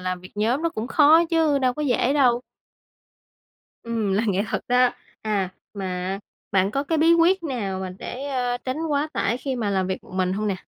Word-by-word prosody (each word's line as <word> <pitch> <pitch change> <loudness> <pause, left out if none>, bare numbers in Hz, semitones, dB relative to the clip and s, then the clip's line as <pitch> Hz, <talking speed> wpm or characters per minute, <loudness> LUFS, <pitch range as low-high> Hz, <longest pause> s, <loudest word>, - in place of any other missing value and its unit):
làm 185 0 -3
việc 185 - -13
nhóm 230 +8 0
nó 335 - +2
cũng 225 -8 -5
khó 310 +5 +6
chứ 315 -4 +3
đâu 255 -2 +1
có 300 - -3
dễ 260 -1 +2
đâu. 250 -4 +3 1.4
Ừm, 225 -4 -1
là 205 +3 +2
nghệ 200 0 +1
thuật - - -2
đó, 250 0 +4 0.3
à, 195 -4 -1 0.2
mà, 195 -1 -4
à, 185 +1 -3 0.3
bạn 195 0 +3
có 275 +6 -1
cái 320 +2 0
bí 325 +2 +5
quyết 340 +2 +3
nào 205 - -3
mà 185 -1 -4
để, 260 +3 -6
a, 245 -2 -1
tránh 255 +2 -4
quá 295 +1 0
tải 235 - 0
khi 260 0 -3
mà 220 -4 -1
làm 190 -2 0
việc 190 - -3
một - - -16
mình 185 -1 +1
hông 210 +2 -2
nè? 195 - -1
245 Hz, 220 wpm, -24 LUFS, 195-285 Hz, 1.4 s, khó